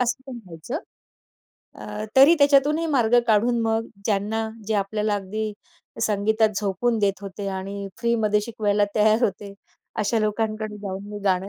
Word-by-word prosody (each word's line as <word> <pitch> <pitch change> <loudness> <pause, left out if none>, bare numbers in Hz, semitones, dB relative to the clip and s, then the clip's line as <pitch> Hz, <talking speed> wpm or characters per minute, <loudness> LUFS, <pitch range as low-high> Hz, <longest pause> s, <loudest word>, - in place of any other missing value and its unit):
असं 250 +1 0
तेव्हा 245 -3 -7
व्हायचं. 170 - -5 1.0
अ, 210 +1 -5
तरी 275 +6 +8
त्याच्यातूनही 290 +3 +4
मार्ग 240 0 +4
काढून 235 +3 +3
मग 225 0 0 0.2
ज्यांना 220 +2 0 0.2
जे 220 - +1
आपल्याला 210 +1 0
अगदी 210 +2 -3 0.5
संगीतात 220 +1 +2
झोकवून 220 +4 0
देत 200 -1 +1
होते 200 0 -6
आणि 195 +1 -5
फ्रीमध्ये 220 -3 +2
शिकवायला 210 -2 +1
तयार 215 +2 +4
होते, 200 0 -3 0.4
अशा 220 +2 +1
लोकांकडे 215 0 -2
जाऊन 195 -1 -6
मी 205 - -5
गाणं 190 0 +1
215 Hz, 140 wpm, -24 LUFS, 200-230 Hz, 1.0 s, तरी